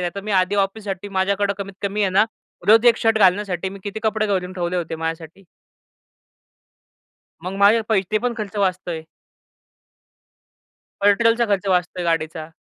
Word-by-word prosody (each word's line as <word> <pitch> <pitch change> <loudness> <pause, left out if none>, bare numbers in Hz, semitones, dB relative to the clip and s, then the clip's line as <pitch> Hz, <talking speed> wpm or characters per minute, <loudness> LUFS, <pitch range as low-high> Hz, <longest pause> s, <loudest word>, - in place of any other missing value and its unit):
नाही 175 -1 -1
तर 200 - -4
मी 215 - -4
आधी 185 +1 +2
ऑफिससाठी 200 0 -2
माझ्याकडे 200 +1 0
कमीत 200 0 -6
कमी 200 +1 -2
आहे 190 - +1
ना 195 +3 +4 0.4
रोज 225 +2 +6
1 235 - +6
शर्ट 225 -1 +2
घालण्यासाठी 190 -1 +2
मी 195 +1 -9
किती 205 +2 -5
कपडे 220 -1 0
करून 185 -3 -1
ठेवले 175 -1 -2
होते 170 -2 -3
माझ्यासाठी. 165 +3 -6 2.0
मग 185 - -4
माझे 210 +3 +5
पैसे 215 -1 +1
पण 245 0 -2
खर्च 210 -1 -6
वाचतोय. 185 -4 -1 2.0
पेट्रोलचा 230 +4 +4
खर्च 200 -1 -1
वाचतोय 180 -1 0
गाडीचा. 160 -1 -2
195 Hz, 145 wpm, -21 LUFS, 180-210 Hz, 2.0 s, रोज